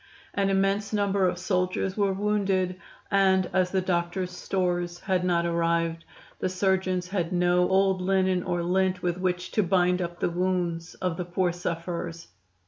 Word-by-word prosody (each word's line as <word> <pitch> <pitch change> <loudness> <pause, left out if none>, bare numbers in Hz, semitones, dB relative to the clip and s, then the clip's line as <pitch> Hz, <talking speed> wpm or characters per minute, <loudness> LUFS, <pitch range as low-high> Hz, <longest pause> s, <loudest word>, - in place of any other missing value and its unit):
An 200 -1 +1
immense 195 +1 +1
number 200 -2 +2
of 180 0 -1
soldiers 185 +1 -1
were 200 -2 +2
wounded, 190 -2 0 0.3
and, 190 -2 +3
as 185 -1 +2
the 190 0 0
doctors' 180 0 -1
stores 175 -1 -2
had 190 -2 0
not 170 -1 +1
arrived, 165 -1 0 0.3
the - - 0
surgeons 185 -1 0
had 180 -3 -1
no 180 0 +2
old 190 -1 +3
linen 185 -1 +2
or 175 0 -2
lint 185 +1 +1
with 175 0 -1
which 180 -1 -1
to 215 - +2
bind 180 -1 +2
up 175 0 -4
the - - 0
wounds 175 -1 -1
of 180 -3 -2
the 180 - -3
poor 180 0 0
sufferers. 170 -1 -5
180 Hz, 160 wpm, -27 LUFS, 175-190 Hz, 0.3 s, and